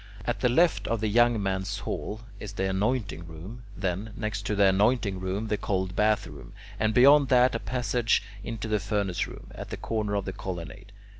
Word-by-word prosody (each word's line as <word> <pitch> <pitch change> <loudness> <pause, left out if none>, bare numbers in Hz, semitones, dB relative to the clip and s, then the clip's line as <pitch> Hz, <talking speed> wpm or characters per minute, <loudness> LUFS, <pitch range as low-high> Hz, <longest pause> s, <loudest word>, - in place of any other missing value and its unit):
At 120 - -1
the 125 - +2
left 165 +8 +3
of 115 -1 0
the 110 - 0
young 120 +1 +4
men's 95 -1 -1
hall 110 +2 -4 0.2
is 105 -1 -7
the 95 -1 -1
anointing 100 -4 -1
room 90 +9 -9
(F); 90 - -11
then, 95 +4 -2
next 105 -2 -3
to 105 - 0
the 100 0 +4
anointing 100 0 +2
room, 95 +4 -2
the 105 -1 0
cold 95 -2 -1
bath 105 0 +2
room - - -11
(G), - - -19 0.2
and 110 0 +2
beyond 140 +3 +7
that 125 -1 +5
a 115 - -1
passage 120 -3 0 0.2
into 115 0 -5
the 105 -1 +1
furnace 100 -3 -1
room - - -11
(H) - - -13
at - - -6
the - - -5
corner 105 -2 -2
of 100 - -1
the 95 - -4
colonnade. 95 +1 -7
105 Hz, 215 wpm, -27 LUFS, 95-115 Hz, 0.2 s, beyond